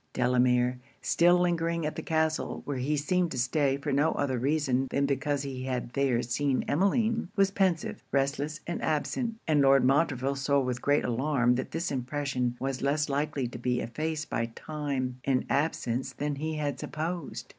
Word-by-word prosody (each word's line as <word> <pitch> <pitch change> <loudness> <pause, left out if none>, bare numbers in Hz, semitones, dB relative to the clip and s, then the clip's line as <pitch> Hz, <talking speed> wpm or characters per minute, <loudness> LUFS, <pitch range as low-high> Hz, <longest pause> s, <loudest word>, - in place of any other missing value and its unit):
Delamere, 125 0 +2 0.2
still 175 +1 +4
lingering 170 -2 0
at 150 - -2
the - - -4
castle, 160 -1 -1
where 140 -2 -3
he 145 +4 0
seemed 175 +4 +1
to - - -5
stay 135 +2 +1
for 140 - -3
no 145 +4 +3
other 130 -3 -1
reason 135 -1 +1
than 140 - +1
because 140 +1 0
he 130 -2 -5
had 125 -2 -3
there 135 -4 +1
seen 135 +3 0
Emmeline, 220 - +1
was 195 -1 +3
pensive, 185 -5 0
restless, 140 +2 0
and 175 - -3
absent; 225 - -1
and 150 -2 +4
Lord 135 -1 +5
Montreville 135 -1 +2
saw 140 +1 +2
with 125 -2 -2
great 145 +1 +2
alarm 125 0 +2
that 130 +1 -2
this 165 +2 -2
impression 130 -2 -1
was 135 -1 -2
less 145 +2 +1
likely 145 -1 -1
to 120 - -8
be 125 0 0
effaced 155 +6 -3
by 115 0 0
time 140 -5 -3
and 130 -2 +1
absence 135 -4 0
than 145 -1 -3
he 155 +2 -3
had 145 -3 -2
supposed. 165 0 -4
140 Hz, 175 wpm, -29 LUFS, 130-155 Hz, 0.2 s, Lord